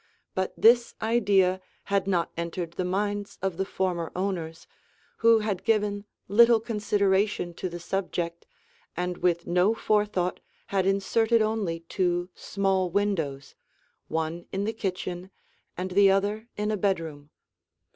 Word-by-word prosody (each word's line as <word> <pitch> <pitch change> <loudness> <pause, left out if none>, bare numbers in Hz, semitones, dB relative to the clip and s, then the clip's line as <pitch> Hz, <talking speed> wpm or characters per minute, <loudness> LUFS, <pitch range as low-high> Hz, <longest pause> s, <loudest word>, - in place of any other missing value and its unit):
But 185 0 -1
this 235 +1 +5
idea 200 -5 +2 0.2
had 200 -1 0
not 175 -3 +1
entered 170 0 -4
the 185 - -2
minds 205 +2 -2
of 190 -3 -2
the 190 - 0
former 180 -4 -2
owners, 175 -4 -3 0.5
who 225 -1 +5
had 205 -4 -2
given 205 -2 +1 0.2
little 235 +3 +6
consideration 205 -4 0
to 185 - -4
the 175 0 -7
subject 175 -2 -3 0.5
and 180 0 -2
with 170 -1 +1
no 180 +5 +3
forethought 210 -5 0 0.3
had 190 -1 +2
inserted 220 +4 +2
only 205 -7 -1
two 175 +1 -1
small 195 -2 0
windows, 170 -8 -1 0.5
one 160 +2 -3
in 195 +1 -2
the 220 +2 -1
kitchen 185 -3 -4 0.5
and 185 +1 -3
the 195 +1 +6
other 205 +3 +1
in 210 +1 -1
a 215 - 0
bedroom. 165 -7 -2
190 Hz, 135 wpm, -27 LUFS, 175-205 Hz, 0.5 s, little